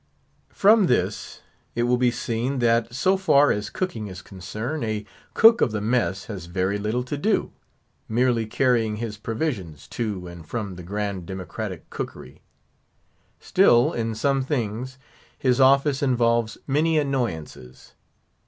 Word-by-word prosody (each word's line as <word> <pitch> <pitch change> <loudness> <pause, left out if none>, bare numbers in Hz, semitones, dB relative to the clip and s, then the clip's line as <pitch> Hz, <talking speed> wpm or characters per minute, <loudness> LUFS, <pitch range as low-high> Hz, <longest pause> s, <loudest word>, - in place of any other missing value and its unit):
From 210 -1 +4
this - - -1 0.3
it 120 - +1
will 120 +1 +3
be 125 -1 +4
seen, 120 +2 -2
that, 115 -1 +2
so 185 +10 +2
far 145 -7 +4
as 105 0 -2
cooking 115 - -3
is 95 -1 -9
concerned, 110 - -5
a 110 -2 -2 0.3
"cook 225 +1 +7
of - - +3
the 110 - -2
mess" 105 -4 0
has 95 -6 -7
very 95 +3 -1
little 110 +4 -1
to 125 +4 -4
do; 205 +9 0 0.6
merely 120 -1 +1
carrying 115 -2 +1
his 110 -1 -5
provisions 110 - -4
to 105 -6 -3
and 85 -2 -10
from 105 -3 -4
the 90 - -9
grand 100 -1 -4
democratic 95 -1 -6
cookery. - - -7 1.0
Still, 120 0 +4
in 115 -1 -2
some 135 +4 +1
things, 130 -2 -3 0.4
his 130 0 +2
office 135 +1 +4
involves 115 -4 +1
many 155 +3 +2
annoyances. 115 - -3
115 Hz, 140 wpm, -24 LUFS, 105-130 Hz, 1.0 s, cook